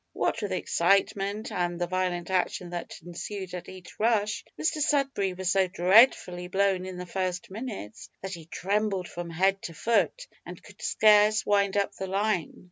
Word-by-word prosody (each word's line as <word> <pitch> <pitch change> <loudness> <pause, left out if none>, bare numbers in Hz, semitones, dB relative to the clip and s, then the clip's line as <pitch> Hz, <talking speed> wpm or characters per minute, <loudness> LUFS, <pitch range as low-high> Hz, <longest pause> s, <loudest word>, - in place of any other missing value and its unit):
What - - -1
with - - -3
excitement 200 +3 +1
and 175 -1 -2
the 175 - +1
violent 180 0 -2
action 180 -1 -1
that 175 -1 -6
ensued 185 +2 -6
at 180 - -6
each 185 -2 -12
rush, 215 -1 +1 0.2
Mr 310 -1 0
Sudberry 270 - +1
was 190 0 0
so 195 -1 +3
dreadfully 180 -1 +4
blown 190 0 +1
in 185 -1 -7
the 180 - -6
first 185 -1 -3
minutes, 205 - -7
that 195 0 -4
he 165 -3 -9
trembled 195 0 -1
from 175 0 -6
head 190 +4 +1
to 165 - -7
foot, 235 - +1 0.2
and - - -10
could - - -16
scarce 215 0 +4
wind 200 -1 +2
up 200 - 0
the 190 - -5
line. 195 -3 0
190 Hz, 170 wpm, -27 LUFS, 180-210 Hz, 0.2 s, dreadfully